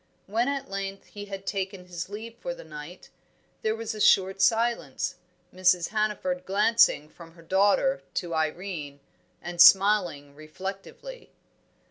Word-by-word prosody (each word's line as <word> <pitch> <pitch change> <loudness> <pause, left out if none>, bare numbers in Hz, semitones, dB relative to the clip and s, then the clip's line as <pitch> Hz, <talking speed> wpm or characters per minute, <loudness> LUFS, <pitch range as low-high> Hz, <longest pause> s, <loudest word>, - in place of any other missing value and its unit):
When 230 +5 0
at 275 -1 -2
length 195 0 -5
he 205 0 -8
had 195 -1 -8
taken 190 -2 -4
his 180 0 -6
leave 225 +3 -8
for 260 +1 -5
the - - -11
night, 155 +3 -11 0.5
there 220 0 0
was 225 -1 -4
a 215 - -6
short 195 0 +4
silence, 225 - +1 0.4
Mrs. 180 -2 +2
Hannaford 210 -4 -1
glancing 200 -6 +3
from 165 +1 -15
her 165 -1 -17
daughter 200 +9 +2
to 175 -2 -3
Irene, 160 -2 -3 0.4
and 175 0 0
smiling 180 -8 +5
reflectively. 195 - -9
195 Hz, 135 wpm, -27 LUFS, 170-215 Hz, 0.5 s, smiling